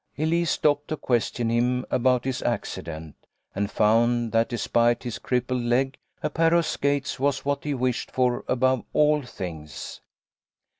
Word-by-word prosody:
Elise 165 +2 +1
stopped 145 -1 +1
to 155 - -3
question 120 -2 0
him 125 +2 +1
about 125 0 +2
his 130 -1 -2
acci 120 -3 -2
dent, 80 -2 -7 0.4
and 100 +1 -1
found 115 +2 +2
that 115 0 +2
despite 120 0 +1
his 120 -3 -5
crippled 125 0 -1
leg 130 +3 +1 0.3
a 150 - +1
pair 165 +2 +3
of 170 -1 +3
skates 140 -2 -1
was 140 0 0
what 140 0 -1
he 145 -1 -1
wished 125 -1 -1
for 125 -1 0
above 130 0 +2
all 150 0 +4
things. 80 - -7
125 Hz, 155 wpm, -25 LUFS, 120-140 Hz, 0.4 s, all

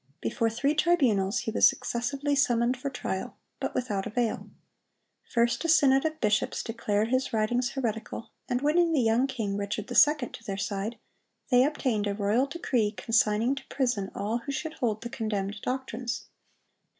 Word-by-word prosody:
Before 225 +4 0
three 275 +6 0
tribunals 250 - +2
he 220 - -3
was - - +6
successively 275 +5 -2
summoned 240 -2 +2
for 265 +2 -4
trial, 190 -7 -4 0.2
but - - -3
without 205 -6 -1
avail. 235 0 -2 0.8
First 235 +3 +1
a 335 - -1
synod 275 -3 +5
of 315 0 -2
bishops 215 -3 +1
declared 220 -1 -1
his 255 +1 0
writings 240 +3 +1
heretical, 230 -4 -4 0.2
and 250 +1 0
winning 330 +3 +3
the 300 - +3
young 235 +2 +3
king, 220 -7 -3
Richard 205 +1 -4
II., 295 -5 +4
to - - -11
their 195 -4 -4
side, 200 +3 -3 0.5
they 250 0 +6
obtained 255 -8 0
a 200 - -1
royal 215 +6 +1
decree 260 -8 0
consigning 225 +4 +2
to 275 - -8
prison 245 -8 -1
all 220 +4 -1
who 260 +4 -6
should 310 +2 -4
hold 220 -7 -1
the 235 - -5
condemned 210 -4 -3
doctrines. 250 -2 -3
240 Hz, 160 wpm, -28 LUFS, 215-270 Hz, 0.8 s, was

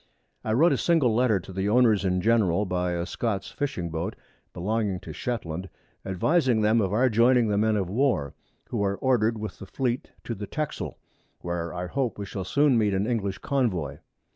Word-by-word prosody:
I 110 - -1
wrote 160 +7 +5
a 135 - 0
single 155 -9 +3
Letter 115 -3 +3
to 95 - -11
the 95 +2 -1
Owners 110 -3 +4
in 90 -1 +1
general, 105 -3 +3
by 90 -1 -1
a 85 0 -2
Scots 100 0 -3
Fishing 95 - -3
Boat 80 0 -3 0.4
belonging 100 +1 -1
to - - -8
Shetland, 95 -7 -4 0.3
advising 120 - +2
them 110 +2 +3
of 95 -2 0
our 120 +5 +3
joining 120 0 +4
the 100 - +1
Men 110 0 +2
of 95 -3 0
War, 100 - 0 0.4
who 110 -4 -1
are 100 0 0
order'd 115 -4 +2
with 105 -3 -6
the 100 - -9
Fleet 125 +3 -2
to 115 - -4
the 105 -1 -6
Texel, 155 +5 -4 0.4
where 85 -1 -3
I 90 0 -4
hope 125 +4 -2
we 100 - -4
shall 95 -1 -5
soon 140 +5 +3
meet 105 -3 +2
an 95 +2 +1
English 105 -5 -1
Convoy. 110 - -1
105 Hz, 190 wpm, -26 LUFS, 95-120 Hz, 0.4 s, wrote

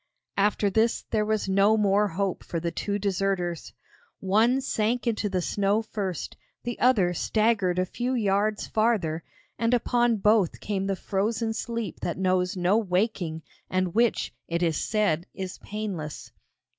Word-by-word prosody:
After 205 +1 +2
this 225 +3 +2
there 215 -1 +2
was 215 -2 0
no 200 +3 +4
more 205 0 +3
hope 195 0 -2
for 170 - -3
the 170 +1 -2
two 205 +3 -2
deserters. 190 -4 -1 0.5
One 220 +7 +3
sank 240 -2 0
into 220 -3 0
the 185 -2 -1
snow 205 +4 +1
first, 195 -6 -4 0.3
the 240 -1 -4
other 205 -9 +4
staggered 215 -2 +1
a 185 - +2
few 245 +7 -2
yards 210 -1 +1
farther, 200 -8 0 0.4
and 230 +1 +3
upon 240 -1 +2
both 210 -3 +3
came 195 -2 -2
the 195 - 0
frozen 220 +4 -1
sleep 230 -1 -4
that - - -3
knows 185 0 +1
no 180 +5 +3
waking 180 -5 -1 0.3
and 185 -2 0
which, 235 0 +1
it 170 +1 -1
is 165 -2 +2
said, 200 -5 0
is 190 -1 -6
painless. 195 -8 -5
200 Hz, 150 wpm, -26 LUFS, 185-220 Hz, 0.5 s, no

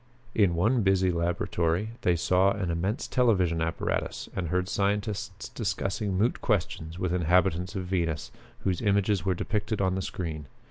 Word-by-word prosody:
In 100 -6 +3
one 115 +8 +3
busy 95 -2 +3
laboratory 85 +2 0
they 90 - +3
saw 95 +3 +3
an 95 -4 -2
immense 95 +7 -1
television 95 -10 +2
apparatus 80 0 -2
and 90 -2 -2
heard 90 +2 0
scientists 105 +1 -2
discussing 100 -2 -2
moot 115 +6 +1
questions 85 -6 -1
with 90 -1 -1
inhabitants 90 +2 +2
of 95 -2 -3
Venus, 85 -4 -1 0.3
whose 95 -3 0
images 100 -3 +2
were 95 -1 +2
depicted 105 +3 -2
on 95 -1 +2
the 95 - -1
screen. 80 -6 -5
95 Hz, 150 wpm, -28 LUFS, 85-100 Hz, 0.3 s, In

